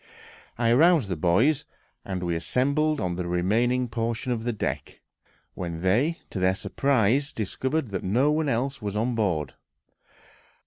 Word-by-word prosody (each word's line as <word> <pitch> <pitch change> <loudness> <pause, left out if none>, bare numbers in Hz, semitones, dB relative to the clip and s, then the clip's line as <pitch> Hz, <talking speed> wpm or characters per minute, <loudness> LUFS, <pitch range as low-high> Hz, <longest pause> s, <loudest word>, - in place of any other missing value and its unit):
I 115 -1 +2
aroused 155 - +4
the 90 - -1
boys, 105 - +2 0.4
and 95 -2 -4
we 85 -1 -1
assembled 140 - +1
on 90 -1 -2
the 90 -1 -3
remaining 115 +9 +1
portion 115 +2 -2
of 115 -2 -2
the 120 - +1
deck, 110 - -4 0.5
when 85 -1 -5
they, 125 - +2
to 95 - -3
their 95 +1 +2
surprise, 135 +3 +1
discovered 130 +6 -2
that 95 -2 -4
no 125 +10 +2
one 155 -1 +1
else 135 +2 -1
was 105 -1 -3
on 120 +3 0
board. 90 -10 -1
115 Hz, 150 wpm, -26 LUFS, 95-135 Hz, 0.5 s, aroused